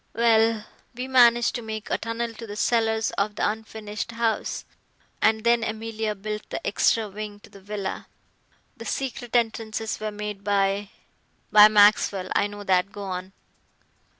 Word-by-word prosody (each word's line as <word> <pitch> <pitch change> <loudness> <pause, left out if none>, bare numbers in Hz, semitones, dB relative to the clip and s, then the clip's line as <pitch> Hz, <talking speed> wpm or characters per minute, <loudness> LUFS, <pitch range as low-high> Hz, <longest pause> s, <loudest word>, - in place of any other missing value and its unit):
Well, 225 -1 +3 0.3
we 250 +2 -4
managed 240 -2 +5
to 240 - -3
make 220 -1 -6
a - - +2
tunnel 230 +1 -3
to 230 +1 -9
the 205 - -7
cellars 225 0 +1
of 205 +1 0
the - - +1
unfinished 220 +1 -5
house, 230 -1 -1 0.6
and 220 0 +3
then 235 0 +3
Emilia 220 -1 -3
built 210 +1 -6
the - - -5
extra 215 +2 +2
wing 205 0 -7
to - - -17
the 195 - -14
villa. 200 -1 -5 0.7
The - - -9
secret 255 -3 -4
entrances 225 -1 -1
were 215 - -3
made 210 -1 -6
by 200 0 +1 0.3
" - - -41
"By 210 0 +10
Maxwell. 205 -3 +4
I 200 - +3
know 205 0 -9
that. 190 0 +2
Go 205 0 -7
on." 185 -1 -5
215 Hz, 160 wpm, -25 LUFS, 205-225 Hz, 0.7 s, By